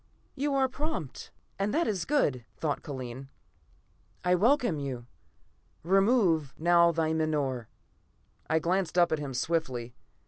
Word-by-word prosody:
"You 285 0 -1
are 265 -1 +3
prompt, 280 - -5 0.3
and 200 +1 0
that 335 - +2
is 195 -6 -1
good," 145 - +1
thought 150 -3 -2
Kellen. 130 -2 -7 0.9
"I 180 - +3
welcome 230 - +3
you. 130 -4 -5 0.8
Remove 190 - +3
now 170 +1 +5
thy 160 -1 0
menore." 145 -7 -1 0.8
I 160 - +3
glanced 180 +2 0
up 175 -1 +5
at 160 - +1
him 140 -3 -5
swiftly. 125 -6 -1
165 Hz, 130 wpm, -29 LUFS, 140-195 Hz, 0.9 s, now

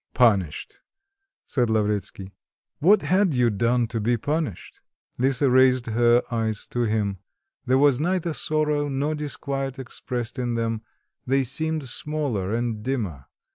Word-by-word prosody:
"Punished," 100 - +2 0.7
said 125 -4 0
Lavretsky.... 105 -3 -1 0.5
"What 195 +5 +5
had 185 +1 +2
you 120 -2 +3
done 120 +4 +1
to 115 - -2
be 120 +3 +1
punished?" 145 - -3 0.4
Lisa 135 +2 +2
raised 130 -1 +4
her 120 +1 +3
eyes 110 -2 -1
to 120 -1 0
him. 105 -3 -1 0.5
There 130 +1 +4
was 140 -2 +4
neither 175 0 0
sorrow 150 -1 0
or 140 +3 0
disquiet 140 -2 -3
expressed 125 -1 -5
in 120 -1 -1
them; 115 -1 -1 0.5
they 135 +1 +2
seemed 155 +3 -2
smaller 125 -8 -2
and 115 -1 -1
dimmer. 105 - -3
125 Hz, 135 wpm, -24 LUFS, 115-145 Hz, 0.7 s, What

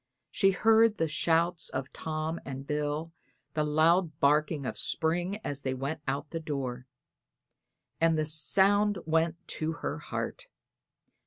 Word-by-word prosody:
She 195 - +3
heard 220 +2 +4
the 165 - +1
shouts 165 +2 +1
of 130 +1 -5
Tom 155 +1 -3
and 135 0 -6
Bill 150 +2 -2
and - - -42
the 155 - +1
loud 155 +1 +2
barking 150 0 +2
of - - -3
Spring 175 +5 0
as 140 -1 -3
they 130 -2 -1
swept 140 +4 -4
out 140 +1 -1
of 145 - -36
the 165 - -3
door; 135 -5 -4 1.1
and 165 -1 +3
the 155 - +1
sound 195 +7 +3
went 160 +1 +2
to 160 0 -2
her - - -2
heart. - - -5
155 Hz, 150 wpm, -29 LUFS, 145-170 Hz, 1.1 s, heard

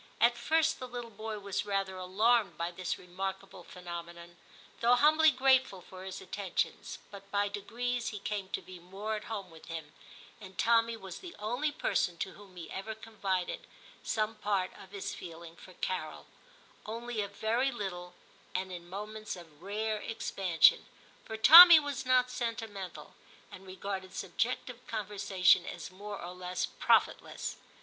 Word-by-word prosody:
At 235 +2 +5
first 315 +6 +1
the 255 - -6
little 240 -1 -7
boy 215 +1 -5
was 200 -1 -3
rather 195 -2 -1
alarmed 200 +3 +2
by 170 +1 -2
this 175 -1 -3
remarkable 190 +1 -6
phenomenon, 170 -1 -9 0.4
though 240 +1 +5
humbly 310 +4 +6
grateful 260 -6 +3
for 185 +1 -11
his 190 0 -6
attentions, 190 0 -3
but 200 -1 -11
by 205 0 +1
degrees 235 +4 -3
he 215 - -3
came 200 -1 -4
to - - -3
be 185 -1 -11
more 195 +5 -5
at 210 - -6
home 200 -5 -5
with 160 -1 -14
him, 160 -2 -7 0.5
and 190 -3 -12
Tommy 230 0 +3
was 190 -4 -9
the 355 -2 -10
only 245 +8 -1
person 180 - 0
to 190 - -3
whom 200 -2 -15
he 170 -2 -9
ever 220 +3 -5
confided 195 -5 -3 0.3
some 215 0 -1
part 200 -3 -1
of 190 - -13
his 200 0 -5
feeling 165 -1 -9
for 185 - -14
Carol; 180 -3 -4 0.6
only 230 0 -3
a 200 - -2
very 230 +6 0
little 180 -6 -6 0.4
and 185 0 -2
in 175 -1 -8
moments 210 +2 -6
of 165 -4 -14
rare 215 +3 -2
expansion, 190 -6 +3 0.4
for 220 - -5
Tommy 330 +9 +12
was 285 -3 -4
not 250 -1 +4
sentimental, 225 -6 -5 0.4
and 190 +1 -11
regarded 190 0 -5
subjective 245 +5 -3
conversation 200 -4 +2
as - - -7
more 205 +2 -7
or 175 +1 -7
less 180 0 -3
profit - - +2
less. - - -6
200 Hz, 155 wpm, -31 LUFS, 185-230 Hz, 0.6 s, Tommy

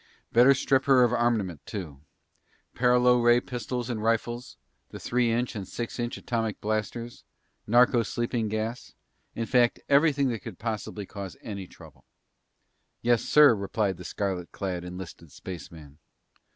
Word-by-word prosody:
"Better 125 +4 +6
strip 130 0 +1
her 130 -2 +6
of 120 0 +2
armament, 110 - 0
too. 80 -10 -7 0.7
Paralo 125 0 +4
ray 120 0 +6
pistols 125 -1 -4
and 115 -4 -3
rifles, 115 - -1 0.3
the - - -9
three 120 -1 +1
inch 120 +1 -1
and 100 -3 -5
six 120 0 -5
inch 120 0 -2
atomic 115 -3 -2
blasters, 110 +3 -3 0.4
narco 120 +1 +5
sleeping 115 0 -2
gas; 110 +3 -4 0.4
in 115 - -2
fact, 120 0 +3
everything 140 -1 +4
that 115 -2 -3
could 110 -7 -9
possibly 110 -2 -4
cause 100 -2 -8
any 100 -4 -6
trouble." - - -16 1.0
"Yes, 120 -1 +3
sir," 150 -4 +6
replied 100 -2 -1
the 90 - -9
scarlet 90 -1 -3
clad 90 -3 -4
enlisted 90 -3 -9
spaceman. 80 -4 -10
115 Hz, 140 wpm, -27 LUFS, 100-120 Hz, 1.0 s, Better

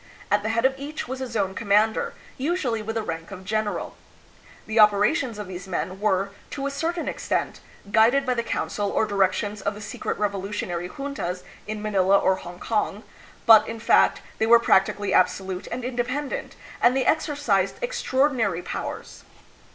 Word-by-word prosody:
At 205 0 +4
the 220 - -2
head 230 +2 +1
of 265 - +4
each 290 0 -5
was 260 +1 -5
a 260 - -2
zone 205 -5 -1
commander, 210 +2 +1 0.2
usually 265 -6 -1
with 220 +1 -4
the 225 - -1
rank 165 -3 -5
of 190 -1 -9
general. 215 +1 -2 0.7
The 220 +1 0
operations 210 +4 +4
of 210 - -5
these 185 0 -7
men 185 +1 -3
were, 200 -1 +1 0.2
to 275 - -4
a 280 - -1
certain 330 +4 -2
extent, - - -2 0.3
guided 235 +5 +4
by 255 - +1
the 235 - 0
counsel 205 -3 -2
or 220 - +1
directions 205 +1 0
of 205 +1 -2
the - - -9
secret 210 0 -4
revolutionary 195 -3 -3
juntas 265 -9 -4 0.2
in 215 0 -4
Manila 200 -2 +3
or 190 -1 +2
Hongkong, 200 +4 -3 0.4
but, 225 -2 +8
in 225 0 -5
fact, - - +3 0.2
they 220 - +2
were 235 +1 +8
practically 200 -3 +2
absolute 185 0 +1
and 250 - -4
independent, 255 +3 -3 0.3
and 250 +2 +4
they 260 - +1
exercised 285 -12 +1
extraordinary 260 - +1
powers. - - -6
215 Hz, 165 wpm, -25 LUFS, 195-250 Hz, 0.7 s, but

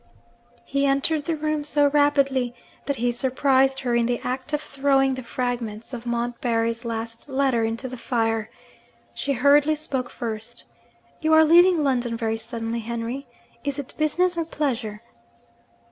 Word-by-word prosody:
He 280 0 +1
entered 280 +2 +1
the 330 - 0
room 305 -1 -1
so 290 0 +2
rapidly 275 -4 +2 0.3
that 280 - 0
he 245 0 0
surprised 265 +2 +2
her 245 -2 -1
in 235 -1 +2
the 240 -1 0
act 255 +3 -3
of 300 - +1
throwing 270 -2 +2
the 260 - -4
fragments 240 -2 -4
of 240 0 -6
Montbarry's 235 -1 -1
last 230 +2 -5
letter 265 -4 +1
into 225 +4 -2
the 255 0 -7
fire. 225 -2 -1 0.6
She 280 - -1
hurriedly 285 +4 +4
spoke 265 -5 -3
first. 230 +1 -6 0.6
'You 315 -1 +2
are 315 0 +7
leaving 345 0 +6
London 245 -4 0
very 225 -1 -1
suddenly, 225 0 -4
Henry. 235 +4 -4 0.4
Is 285 -1 -2
it 280 -2 -6
business? 350 +4 +1
or 335 - 0
pleasure?' 240 -9 -3
260 Hz, 150 wpm, -24 LUFS, 235-285 Hz, 0.6 s, are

